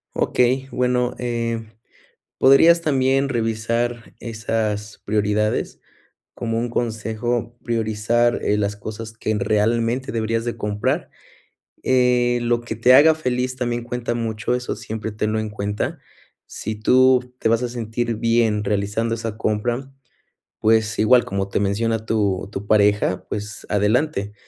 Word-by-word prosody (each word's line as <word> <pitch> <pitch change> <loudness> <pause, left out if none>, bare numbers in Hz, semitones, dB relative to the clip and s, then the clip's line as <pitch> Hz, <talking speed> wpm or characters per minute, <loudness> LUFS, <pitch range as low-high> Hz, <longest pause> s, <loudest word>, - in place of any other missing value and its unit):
Okey. 130 +2 +1
Bueno, 125 -1 0
eh, 115 -2 -3 0.7
podrías 165 +6 +6
también 135 -3 +2
revisar 115 0 -2
esas 110 -2 -3
prioridades 105 +1 0 0.6
como 115 -1 -2
un 120 +1 -2
consejo 115 +1 -2
priorizar, 115 +1 +1
eh, 105 - +1
las 105 0 -1
cosas 110 +2 -7
que 110 - -1
realmente 115 +5 0
deberías 115 0 -1
de 120 - -2
comprar. 105 -2 -2 0.8
Eh, 125 -1 +3
lo 120 0 +1
que 115 -1 -5
te 120 +3 +5
haga 155 +4 +7
feliz 130 -4 -2
también 120 -2 -2
cuenta 120 -1 -3
mucho, 115 0 -2
eso 125 0 -4
siempre 110 0 -5
tenlo 110 +1 -1
en 110 -1 -3
cuenta. 105 0 -3 0.5
Si 110 - -5
tú 125 +3 +3
te - - 0
vas 115 +1 +2
a 125 - -1
sentir 120 0 -3
bien 115 -2 +1
realizando 105 +3 -1
esa 115 -1 -5
compra, 120 +5 -2 0.7
pues, 110 0 +2
igual 120 +3 +5
como 100 0 -3
te - - 0
menciona 110 +3 0
tu 100 -4 0
tu 100 -1 -5
pareja. 105 -2 +2
Pues, 105 0 -6
adelante. 105 +1 +1
115 Hz, 130 wpm, -21 LUFS, 105-120 Hz, 0.8 s, haga